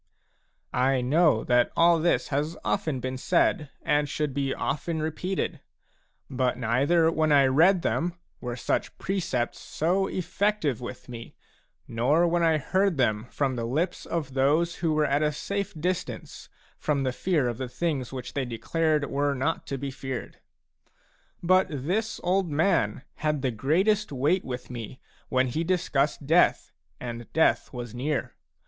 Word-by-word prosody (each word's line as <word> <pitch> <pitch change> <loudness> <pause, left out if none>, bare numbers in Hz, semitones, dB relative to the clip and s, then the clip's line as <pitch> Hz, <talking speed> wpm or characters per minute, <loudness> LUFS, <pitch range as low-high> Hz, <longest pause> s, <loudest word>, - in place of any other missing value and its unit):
I 130 0 +2
know 150 -1 +3
that 120 -1 +3
all 170 0 +5
this 170 +2 +1
has 150 +4 -1
often 160 -9 0
been 130 0 -4
said 155 -2 +2
and 145 0 +1
should 150 -1 -2
be 135 0 -1
often 160 +4 -2
repeated; 160 +5 -2 0.7
but 130 -1 0
neither 140 +8 +3
when 155 -1 +1
I 140 -2 +6
read 165 +7 +4
them 175 +1 0 0.2
were 120 -1 -4
such - - -2
precepts 165 -11 -2
so 185 +5 0
effective 185 - -1
with 120 0 -8
me, 115 -2 -9 0.5
nor 140 +9 +2
when 170 0 +1
I 165 -2 +4
heard 190 +3 +1
them 110 -3 +1
from 135 -3 -1
the 115 -1 -2
lips 160 +9 -2
of 150 -6 -3
those 150 +6 +2
who 165 -2 0
were 155 0 +2
at 145 +1 +1
a 150 0 +2
safe 200 +7 -3
distance 175 -8 -4 0.3
from 145 -2 0
the 130 -1 -1
fear 150 0 +1
of 120 0 -3
the 130 -2 -4
things 140 -4 -2
which 130 -2 -6
they 140 - -1
declared 150 +6 0
were 140 0 0
not 135 +5 -1
to 140 - -3
be 140 +1 -4
feared. 130 -1 -6 1.0
But 185 +2 +4
this 180 - -2
old 185 0 +1
man 145 - +1
had 150 -3 -1
the 130 - +1
greatest 185 - +1
weight 145 +8 +1
with 125 -1 -6
me 120 +1 -7 0.3
when 130 0 +2
he 155 +7 -1
discussed 150 -5 0
death 165 +5 +3 0.3
and 120 -1 -7
death 160 - +2
was 120 -3 -6
near. 140 +4 -2
145 Hz, 155 wpm, -27 LUFS, 130-170 Hz, 1.0 s, I